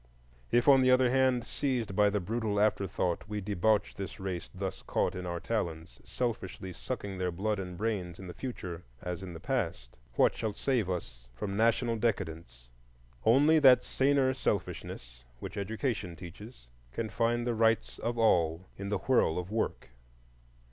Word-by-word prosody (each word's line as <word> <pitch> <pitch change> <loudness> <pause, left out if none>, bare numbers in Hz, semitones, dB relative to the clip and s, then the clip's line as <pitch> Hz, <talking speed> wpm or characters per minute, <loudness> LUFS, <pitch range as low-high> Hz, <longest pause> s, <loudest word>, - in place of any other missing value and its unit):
If, 120 +2 +3
on 135 -2 +8
the 130 - +4
other 130 -1 +5
hand, 130 -2 +3
seized 120 -9 -1
by 105 0 +5
the 105 0 0
brutal 105 +1 -1
afterthought, 95 -5 +1
we 105 -1 -2
debauch 105 +1 +1
the 95 -2 -5
race 95 -2 -4
thus 95 0 -5
caught - - 0
in 90 0 -5
our 85 0 -3
talons, 80 - -3
selfishly 95 -6 -3
sucking 100 -1 -5
their 90 -1 0
blood 100 +4 -1
and 90 -2 -6
brains 100 -5 -2
in 95 - -9
the 90 - -7
future 95 -10 -6 0.2
as 90 +1 -4
in 95 -2 -7
the 80 - -8
past, 85 - -2 0.2
what - - +4
shall 110 -2 -3
save 120 -4 0
us - - -5
from 100 +10 -4
national 115 +2 +2
decadence? 80 - -3 0.6
Only 145 +7 +6
that 130 -4 +7
saner 135 -1 +2
selfishness, 60 - -3
which - - -7
Education 105 -3 -2
teaches, 90 - -11 0.2
can 110 - -3
find 120 +2 +1
the 120 - +1
rights 115 0 +1
of 120 +1 -2
all 85 -6 +3
in 100 0 -5
the 105 - +1
whirl 95 -5 +2
of 90 +2 -4
work. 110 - -2
105 Hz, 165 wpm, -31 LUFS, 90-120 Hz, 0.6 s, on